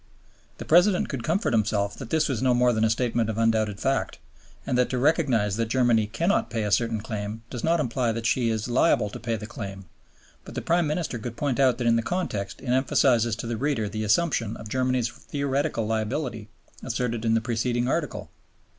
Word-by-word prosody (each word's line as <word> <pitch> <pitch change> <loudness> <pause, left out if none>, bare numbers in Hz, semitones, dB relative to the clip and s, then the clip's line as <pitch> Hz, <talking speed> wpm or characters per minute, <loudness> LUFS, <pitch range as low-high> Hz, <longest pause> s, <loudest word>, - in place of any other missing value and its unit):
The - - -7
President 180 +3 +4
could 130 -5 -4
comfort 170 - 0
himself 100 -2 +1
that 130 - -8
this 160 +1 +2
was 130 -5 -2
no 130 -1 +3
more 125 0 +3
than 110 -1 +1
a 110 - +4
statement 115 -1 0
of 110 - -3
undoubted 110 -3 +1
fact, 135 0 -1 0.5
and - - -1
that 125 0 +2
to 130 - -1
recognize 125 - +2
that 115 -1 0
Germany 120 -3 +2
cannot 170 - 0
pay 115 -2 -2
a 105 - -2
certain 115 +1 +1
claim 110 +1 -5
does 120 - -5
not 165 +1 +2
imply 125 -3 0
that 115 0 -4
she 120 0 +2
is 110 0 -2
liable 120 -4 +2
to - - -7
pay 115 +1 -2
the 110 - -6
claim; 100 -4 -7 0.6
but - - -11
the - - -2
Prime 170 -1 +2
Minister 150 -5 -2
could 120 +1 -7
point 140 -3 -1
out 130 -3 +4
that 125 - -3
in 115 0 +4
the - - +1
context 110 - -3
it 125 - -6
emphasizes 125 -3 +3
to 115 - -6
the 115 -1 -3
reader 130 -4 0
the 110 +2 -4
assumption 115 -1 +1
of 110 - -9
Germany's 130 -1 0
theoretic 140 +1 -2
liability 110 +1 -2 0.3
asserted 120 -2 -2
in 115 -1 +2
the - - +3
preceding 120 +1 -1
Article. 150 +2 -2
120 Hz, 210 wpm, -25 LUFS, 110-135 Hz, 0.6 s, President